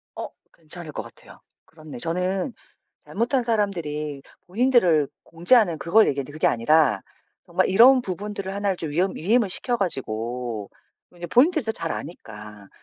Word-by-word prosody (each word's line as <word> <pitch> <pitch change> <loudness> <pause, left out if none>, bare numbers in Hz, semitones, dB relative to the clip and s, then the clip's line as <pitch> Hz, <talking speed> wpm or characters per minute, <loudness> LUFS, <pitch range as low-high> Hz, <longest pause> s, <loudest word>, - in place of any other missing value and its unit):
어. - - -5 0.2
괜찮을 165 0 -7
것 - - -5
같아요. - - -16 0.3
그렇네. 155 -4 -12
저는 180 - -2 0.5
잘못한 240 +5 -1
사람들이 160 - -2 0.3
본인들을 185 - +3 0.2
공지하는 175 +1 +3
그걸 170 +9 +4
얘기하는데 140 0 -2
그게 155 - +1
아니라 120 -2 +3 0.4
정말 - - 0
이런 250 +7 +7
부분들을 200 -1 -5
하나를 200 -2 -1
좀 160 -3 -4
위엄 180 +5 0
위임을 210 +4 +1
시켜 245 +6 -2
가지고 120 - -3 0.5
이제 175 0 -6
본인들이 300 - +3
더 220 - 0
잘 165 - -4
아니까 105 - -9
175 Hz, 340 characters per minute, -24 LUFS, 150-210 Hz, 0.5 s, 이런